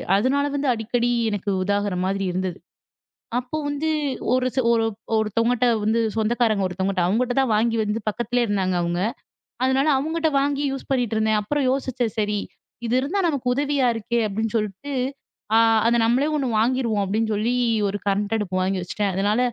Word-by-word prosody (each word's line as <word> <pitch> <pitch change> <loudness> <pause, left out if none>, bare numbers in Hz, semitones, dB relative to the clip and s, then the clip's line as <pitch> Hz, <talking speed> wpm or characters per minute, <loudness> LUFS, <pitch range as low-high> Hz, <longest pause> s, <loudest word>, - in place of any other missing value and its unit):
அதுனால 265 +7 +2
வந்து 285 0 -1
அடிக்கடி 235 +2 -1 0.2
எனக்கு 205 -1 -3
உதாகுற 205 0 0
மாதிரி 195 +1 -1
இருந்தது. 185 0 -3 0.8
அப்போ 250 +5 -4
வந்து 290 +2 -1 0.4
ஒரு 255 0 +2
ச - - +1
ஒரு 225 -1 +2 0.3
ஒருத்தங்கிட்ட 230 +3 +1 0.2
வந்து 225 +2 +2 0.2
சொந்தக்காரங்க 220 -2 +1
ஒருத்தங்கிட்ட 185 0 -1
அவங்ககிட்ட 245 +6 +1
தான் 265 -4 +2
வாங்கி 225 +2 +2
வந்து 210 +2 -2
பக்கத்திலேயே 240 +2 0
இருந்தாங்க 190 -3 0
அவங்க. 170 +1 -1 0.7
அதுனால 265 +3 +2
அவங்கிட்ட 320 +2 0
வாங்கி 285 +1 0
யூஸ் 270 - -7
பண்ணிட்டு 245 -4 0
இருந்தேன். 220 0 +2
அப்புறம் 285 +6 -1
யோசிச்சேன் 260 -4 -1
சரி, 210 0 0 0.5
இது 230 - -1
இருந்தா 335 +9 -1
நமக்கு 280 -6 -2
உதவியா 280 -2 +1
இருக்கே 235 +2 -1
அப்டின்னு 220 +2 -2
சொல்ட்டு. 215 +7 -4 0.6
ஆ - - +7 0.3
அத 235 - +3
நம்மளே 255 +6 +2
1 270 -3 -1
வாங்கிருவோம் 230 -3 +1
அப்டின்னு 220 +3 0
சொல்லி 230 +4 0 0.3
ஒரு 205 +1 -3
கரண்ட் 205 +2 0
அடுப்பு 185 -3 -2
வாங்கி 190 0 0
வச்சுட்டேன். 200 +2 -2
அதனால 205 +4 +1
225 Hz, 160 wpm, -23 LUFS, 205-255 Hz, 0.8 s, ஆ